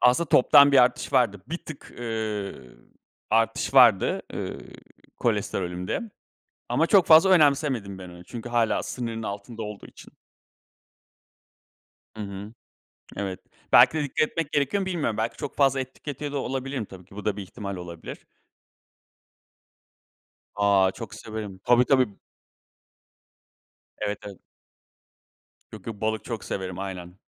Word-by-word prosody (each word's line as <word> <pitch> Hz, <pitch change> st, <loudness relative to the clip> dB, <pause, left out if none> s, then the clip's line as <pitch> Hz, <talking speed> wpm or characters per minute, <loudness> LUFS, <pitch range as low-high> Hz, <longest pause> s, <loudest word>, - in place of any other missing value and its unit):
Aslında 125 Hz, +7 st, +4 dB
toptan 145 Hz, 0 st, +7 dB
bir 140 Hz, -, +7 dB
artış 125 Hz, +3 st, 0 dB
vardı. 115 Hz, -7 st, +2 dB
Bir 170 Hz, +3 st, -3 dB
tık, 155 Hz, -4 st, -11 dB
ııı, 110 Hz, -, -4 dB, 0.5 s
artış 115 Hz, +3 st, +1 dB
vardı, 120 Hz, -7 st, +5 dB
ııı, -, -, -4 dB, 0.6 s
kolesterolümde. 90 Hz, 0 st, -1 dB, 0.7 s
Ama -, -, +2 dB
çok 195 Hz, -5 st, +5 dB
fazla 165 Hz, +4 st, +7 dB
önemsemedim 140 Hz, -, +3 dB
ben 90 Hz, -1 st, -9 dB
onu. 90 Hz, 0 st, -12 dB
Çünkü 120 Hz, +4 st, -8 dB
hâlâ 120 Hz, -2 st, +1 dB
sınırın 115 Hz, -2 st, -4 dB
altında 105 Hz, +2 st, -6 dB
olduğu 105 Hz, -1 st, -7 dB
için. -, -, -15 dB, 2.0 s
Hı 110 Hz, -, -5 dB
hı. 100 Hz, +1 st, -7 dB, 0.6 s
Evet, 95 Hz, -2 st, -4 dB, 0.3 s
belki -, -, +8 dB
de -, -, 0 dB
dikkat 145 Hz, +2 st, 0 dB
etmek 165 Hz, -3 st, -4 dB
gerekiyor 145 Hz, +7 st, +1 dB
ama 190 Hz, -, -2 dB
bilmiyorum. 165 Hz, -, -1 dB
Belki 115 Hz, +1 st, -2 dB
çok -, -, -6 dB
fazla 135 Hz, -1 st, +3 dB
et 130 Hz, 0 st, -6 dB
tüketiyor 145 Hz, 0 st, -6 dB
da 145 Hz, -, -1 dB
olabilirim 135 Hz, -2 st, -3 dB
tabii 95 Hz, -2 st, -13 dB
ki. 95 Hz, +2 st, -17 dB
Bu 105 Hz, -, -7 dB
da 105 Hz, -2 st, 0 dB
bir 100 Hz, -, -5 dB
ihtimal 100 Hz, 0 st, -7 dB
olabilir. 85 Hz, -2 st, -8 dB, 2.4 s
A, 100 Hz, -2 st, +4 dB
çok 110 Hz, +1 st, -8 dB
severim. 105 Hz, -3 st, -7 dB
Tabii 125 Hz, 0 st, +5 dB
tabii. 130 Hz, -2 st, +3 dB, 1.9 s
Evet, 105 Hz, 0 st, -2 dB
evet. 100 Hz, -2 st, -9 dB, 1.3 s
Yok 105 Hz, -4 st, -11 dB
yok 110 Hz, -3 st, -6 dB
balık 110 Hz, 0 st, -1 dB
çok 115 Hz, -4 st, -5 dB
severim, 95 Hz, -2 st, -4 dB
aynen. 90 Hz, -2 st, -6 dB
115 Hz, 135 wpm, -25 LUFS, 100-135 Hz, 2.4 s, belki